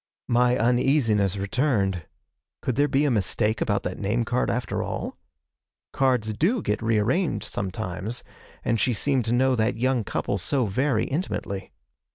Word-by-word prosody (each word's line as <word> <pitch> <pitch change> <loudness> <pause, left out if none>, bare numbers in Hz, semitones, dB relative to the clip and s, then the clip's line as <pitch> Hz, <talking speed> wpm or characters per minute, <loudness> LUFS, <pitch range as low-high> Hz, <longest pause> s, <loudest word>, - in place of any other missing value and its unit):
My 125 +1 +3
uneasiness 115 -5 +2
returned. 100 - 0 0.6
Could 125 - -1
there 145 +1 +3
be 145 +1 +2
a 145 - +2
mistake 110 +1 0
about 100 -3 +1
that 90 - -4
name 110 +4 0
card 125 +3 0
after 125 +1 -1
all? - - -4 0.8
Cards 125 -5 +1
do 190 - +1
get 105 - -1
re 115 0 +2
arranged 155 - +1
sometimes, 100 +3 -4 0.4
and 115 - +1
she 125 +5 +2
seemed 130 +1 +1
to 115 - -1
know 130 +2 +3
that 115 +1 +1
young 130 0 +1
couple 100 0 -2
so 130 +7 +1
very 120 +4 +1
intimately. 135 - -3
115 Hz, 155 wpm, -25 LUFS, 105-130 Hz, 0.8 s, My